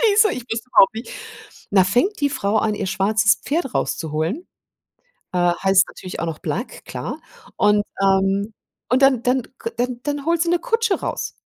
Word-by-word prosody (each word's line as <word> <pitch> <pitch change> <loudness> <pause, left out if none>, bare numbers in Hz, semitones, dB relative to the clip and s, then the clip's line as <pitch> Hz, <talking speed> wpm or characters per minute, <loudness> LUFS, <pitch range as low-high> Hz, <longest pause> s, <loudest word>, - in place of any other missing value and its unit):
die 425 -3 +4
so 430 0 +6
ich 250 -8 -5
wusste 225 +2 -3
überhaupt 230 -1 +5
nicht 225 - -7 0.6
da 190 -2 +5
fängt 250 - +1
die 285 - +2
Frau 205 -5 -1
an, 215 0 +1
ihr 200 -1 -3
schwarzes 200 +1 +2
Pferd 300 -3 -2
rauszuholen. 160 - -2 0.9
Äh, 175 -1 +2
heißt 190 0 +5
natürlich 185 -3 -8
auch 170 - -2
noch 160 -2 -4
Black, 240 - -5
klar. - - -6 0.4
Und, 210 0 +3 0.2
ähm 195 +2 +2 0.4
und 255 +2 +3
dann 265 -3 +4
dann 255 +1 +2 0.2
k 230 - -4
dann 245 +1 -2
dann 290 -1 -3
holt 335 0 +2
sie 340 - -1
'ne 350 0 +2
Kutsche 460 -4 0
raus. - - -3
225 Hz, 185 wpm, -21 LUFS, 195-285 Hz, 0.9 s, so